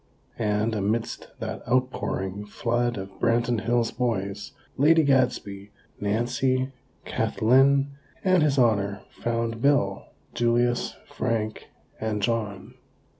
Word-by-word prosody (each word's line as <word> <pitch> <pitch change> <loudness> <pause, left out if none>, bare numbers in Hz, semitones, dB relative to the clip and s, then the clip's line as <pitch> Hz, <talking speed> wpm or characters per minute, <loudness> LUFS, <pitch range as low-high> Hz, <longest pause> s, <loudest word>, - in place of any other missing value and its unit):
And, 105 0 +1
amidst 110 +2 -2
that - - -4
outpouring 105 -6 -1
flood 120 +2 -1
of 95 0 -6
Branton 115 -1 +1
Hills 120 -1 +2
boys, 105 -3 -2 0.2
Lady 160 +3 +5
Gadsby, 125 -8 +1 0.3
Nancy, 125 +5 0 0.3
Kathlyn 135 +4 +3 0.3
and 185 -2 +4
His 145 -2 +2
Honor 100 -5 +2
found 115 -1 -2
Bill, 120 -9 +2 0.3
Julius, 120 +1 +1
Frank 110 -2 -2 0.3
and 110 -1 -1
John. 110 -4 -2
115 Hz, 100 wpm, -26 LUFS, 105-125 Hz, 0.3 s, Lady